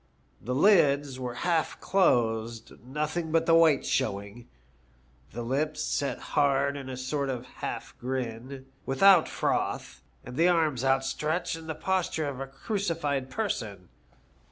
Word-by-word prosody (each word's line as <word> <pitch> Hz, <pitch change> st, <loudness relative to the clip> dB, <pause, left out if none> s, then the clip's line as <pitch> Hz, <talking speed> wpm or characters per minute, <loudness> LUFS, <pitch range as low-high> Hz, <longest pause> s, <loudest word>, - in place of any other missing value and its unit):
The 125 Hz, +3 st, -3 dB
lids 145 Hz, -6 st, +4 dB
were 125 Hz, -2 st, -4 dB
half 170 Hz, -3 st, 0 dB
closed, 115 Hz, -, +1 dB
nothing 150 Hz, +5 st, -3 dB
but 165 Hz, 0 st, +2 dB
the 165 Hz, -, +4 dB
whites 165 Hz, -4 st, +5 dB
showing; 100 Hz, -1 st, -2 dB, 0.8 s
the 120 Hz, -, -6 dB
lips 145 Hz, +6 st, -1 dB
set 140 Hz, -, -1 dB, 0.2 s
hard 140 Hz, 0 st, +2 dB
in 135 Hz, -2 st, -7 dB
a 130 Hz, -, -5 dB
sort 140 Hz, +2 st, -2 dB
of 125 Hz, -2 st, -4 dB
half -, -, -6 dB
grin, 130 Hz, +1 st, -4 dB, 0.2 s
without 175 Hz, +5 st, +5 dB
froth, -, -, -2 dB, 0.2 s
and 125 Hz, +1 st, -8 dB
the 170 Hz, -, +5 dB
arms 155 Hz, -7 st, +2 dB
outstretched 135 Hz, +6 st, 0 dB
in 165 Hz, 0 st, -10 dB
the 160 Hz, -, -3 dB
posture 175 Hz, -4 st, -1 dB
of 135 Hz, -2 st, -5 dB
a 135 Hz, -, -4 dB
crucified 150 Hz, -, -2 dB
person. 110 Hz, -, -3 dB
140 Hz, 135 wpm, -28 LUFS, 125-160 Hz, 0.8 s, whites